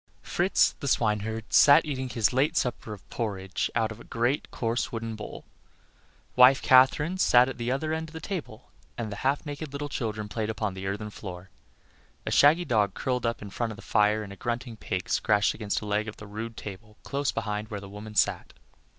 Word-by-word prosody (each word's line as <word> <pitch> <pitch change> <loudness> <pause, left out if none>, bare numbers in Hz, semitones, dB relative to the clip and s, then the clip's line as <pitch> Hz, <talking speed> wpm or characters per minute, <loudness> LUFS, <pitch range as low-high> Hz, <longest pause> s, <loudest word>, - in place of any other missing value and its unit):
Fritz, 180 +3 +2
the 140 - -4
swineherd, 110 -2 0
sat 150 +3 +7
eating 130 -3 -3
his 115 -2 +1
late 135 +4 +2
supper 120 -3 -1
of 105 -3 -10
porridge 95 -5 -2
out 115 -1 +1
of 110 - -9
a - - -11
great, 120 +5 -1
coarse, 115 0 -2
wooden 115 -1 -4
bowl; 105 - -8 0.9
wife 125 +2 +7
Katherine 145 +7 +4
sat 125 -7 +6
at 135 - -6
the 120 +1 -1
other 155 +4 -1
end 160 0 -3
of - - -17
the 160 - -6
table, 150 - -6 0.3
and 115 -3 -4
the 100 - -5
half 140 +6 0
naked 145 0 -6
little 145 +1 -4
children 110 -5 -3
played 110 +1 -3
upon 105 -2 -2
the 95 0 -6
earthen 105 +2 -4
floor. 95 -2 -9 0.7
A - - -2
shaggy 160 +5 +5
dog 105 - +1
lay - - -7
curled 125 -2 0
up 115 -2 -3
in 100 - -8
front 115 +1 -2
of - - -7
the - - -13
fire, 105 0 +2
and 100 -1 -8
a - - -13
grunting 120 +1 -3
pig 95 -4 -4
scratched 105 -1 +2
against 105 -2 -2
a - - -7
leg 105 +1 0
of 110 - -7
the 105 - -10
rude 110 +2 -6
table 105 +2 -9
close 140 0 -1
beside 105 -1 -3
where 105 - -4
the 100 - -10
woman 105 +2 -9
sat. - - +1
115 Hz, 210 wpm, -27 LUFS, 105-130 Hz, 0.9 s, sat